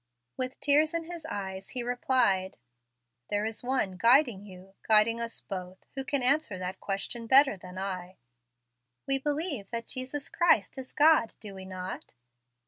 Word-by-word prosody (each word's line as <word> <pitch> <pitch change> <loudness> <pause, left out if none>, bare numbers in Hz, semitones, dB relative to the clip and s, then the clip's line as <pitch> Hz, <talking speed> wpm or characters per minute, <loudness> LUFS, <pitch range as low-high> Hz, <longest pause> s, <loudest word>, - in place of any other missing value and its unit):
With 255 0 -4
tears 300 +3 +3
in 335 - -1
his 335 -1 -8
eyes, 190 -5 -5
he 250 -2 -2
replied, 240 -6 +1 0.7
"There 205 +1 0
is 220 +1 -4
One 245 -7 -1
guiding 235 -1 +4
you 190 0 -13
guiding 225 +2 +3
us 230 0 -5
both 185 -1 -7
who 270 - -1
can 275 -1 -1
answer 275 -6 +2
that 185 0 -5
question 210 +4 -4
better 270 -1 +7
than 180 0 -11
I." 185 -1 -5 0.9
"We 270 0 +2
believe 290 - -2
that 230 -1 -4
Jesus 260 +3 -5
Christ 285 - +2
is 260 - -8
God, 305 -6 +4
do 205 -2 -8
we 190 -1 -9
not?" 185 -6 -7
230 Hz, 155 wpm, -29 LUFS, 190-270 Hz, 0.9 s, better